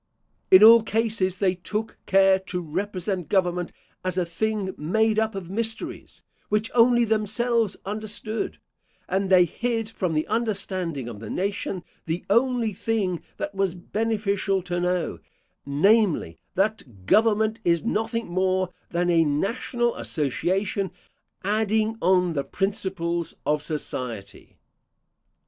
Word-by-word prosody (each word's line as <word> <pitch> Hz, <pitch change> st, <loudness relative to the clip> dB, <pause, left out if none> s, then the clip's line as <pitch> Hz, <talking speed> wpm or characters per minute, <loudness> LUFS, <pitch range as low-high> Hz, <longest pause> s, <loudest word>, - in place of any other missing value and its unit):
In 185 Hz, +2 st, +8 dB
all 230 Hz, +1 st, +10 dB
cases 215 Hz, -4 st, 0 dB
they 190 Hz, -2 st, +2 dB
took 210 Hz, +4 st, -4 dB
care 195 Hz, 0 st, +5 dB
to 185 Hz, -1 st, -4 dB
represent 185 Hz, +2 st, -3 dB
government 180 Hz, -2 st, +1 dB, 0.3 s
as 185 Hz, 0 st, -2 dB
a 180 Hz, -, +2 dB
thing 195 Hz, +3 st, -2 dB
made 220 Hz, +8 st, +1 dB
up 220 Hz, -1 st, 0 dB
of 185 Hz, -2 st, -6 dB
mysteries, 225 Hz, +2 st, -3 dB, 0.3 s
which 210 Hz, +1 st, 0 dB
only 240 Hz, 0 st, +5 dB
themselves 220 Hz, +1 st, +1 dB
understood; 215 Hz, +2 st, -3 dB, 0.5 s
and 190 Hz, +1 st, 0 dB
they 185 Hz, -2 st, +6 dB
hid 225 Hz, +4 st, -2 dB
from 180 Hz, -7 st, -2 dB
the 155 Hz, -, +1 dB
understanding 190 Hz, -, -2 dB
of 115 Hz, -4 st, -7 dB
the 110 Hz, -1 st, -8 dB
nation 195 Hz, -1 st, -2 dB, 0.2 s
the 165 Hz, +2 st, -3 dB
only 235 Hz, -1 st, +2 dB
thing 190 Hz, -4 st, -1 dB, 0.2 s
that 200 Hz, -, -4 dB
was 195 Hz, -2 st, 0 dB
beneficial 200 Hz, -1 st, -1 dB
to 175 Hz, -1 st, -2 dB
know, 180 Hz, -1 st, -1 dB, 0.5 s
namely, 165 Hz, -, +2 dB, 0.2 s
That 185 Hz, -, -2 dB
government 220 Hz, -, +3 dB
is 170 Hz, -1 st, +2 dB
nothing 230 Hz, +1 st, -1 dB
more 185 Hz, 0 st, 0 dB, 0.2 s
than 175 Hz, +1 st, +1 dB
a 165 Hz, -1 st, +5 dB
national 235 Hz, -, 0 dB
association 185 Hz, +7 st, -1 dB, 0.5 s
adding 215 Hz, +2 st, +1 dB
on 180 Hz, -1 st, +3 dB
the 140 Hz, -3 st, -1 dB
principles 175 Hz, -1 st, -2 dB
of 150 Hz, 0 st, +1 dB
society. 125 Hz, -9 st, -5 dB
195 Hz, 125 wpm, -25 LUFS, 175-220 Hz, 0.5 s, all